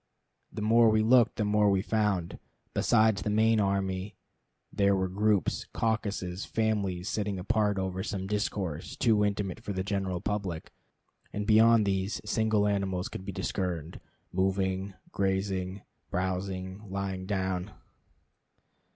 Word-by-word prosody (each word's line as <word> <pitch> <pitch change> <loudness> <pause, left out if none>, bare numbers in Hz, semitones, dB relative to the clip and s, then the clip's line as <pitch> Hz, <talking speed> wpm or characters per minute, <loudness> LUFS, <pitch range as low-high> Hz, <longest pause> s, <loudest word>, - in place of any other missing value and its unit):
The 105 - -5
more 115 +1 +5
we 110 0 +3
looked 120 +1 +5
the 110 -3 0
more 105 0 +3
we 95 -1 +2
found; 105 -6 0 0.3
besides 110 -2 +3
the 105 - -2
main 110 +1 +3
army 95 0 -1 0.6
there 100 -1 +3
were 95 -1 0
groups, 100 0 +1
caucuses, 100 -5 -1
families 100 -5 -1
sitting 105 -3 -1
apart 105 +1 +1
over 95 -1 -2
some 95 -2 -3
discourse 95 -5 -3
too 110 -3 +3
intimate 100 -1 -1
for 105 -3 -5
the 95 0 -2
general 95 -2 -2
public; 95 -5 -3 0.6
and 105 0 -3
beyond 110 +1 +6
these 95 +1 -1
single 110 -1 +2
animals 95 -2 -1
could 95 - -7
be 100 - -4
discerned, 85 -5 -3 0.3
moving, 95 +1 0 0.2
gazing, 95 -1 -1 0.3
browsing, 95 +2 -3
lying 95 -1 -3
down. 95 -1 -1
100 Hz, 130 wpm, -29 LUFS, 95-105 Hz, 0.6 s, beyond